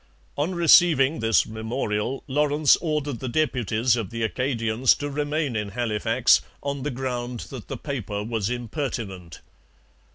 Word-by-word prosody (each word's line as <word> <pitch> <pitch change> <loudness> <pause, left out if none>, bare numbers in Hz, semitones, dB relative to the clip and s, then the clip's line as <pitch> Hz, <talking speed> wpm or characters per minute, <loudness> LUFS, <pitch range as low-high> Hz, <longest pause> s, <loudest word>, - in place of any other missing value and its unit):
On 160 +6 -1
receiving 165 -4 +5
this 115 -1 +3
memorial 110 +2 -3
Lawrence 150 +1 +3
ordered 150 -6 -2
the 130 - -4
deputies 120 -4 +1
of 110 -6 -3
the 115 0 -4
Acadians 115 0 +1
to 145 0 -5
remain 145 -2 -1
in 105 -1 -2
Halifax, 110 -1 +2 0.2
on 140 -1 -3
the 145 - -2
ground 125 -2 -4
that 130 -5 -8
the - - -5
paper 105 - -4
was 110 -2 -2
impertinent. 115 - -5
125 Hz, 135 wpm, -24 LUFS, 110-145 Hz, 0.2 s, receiving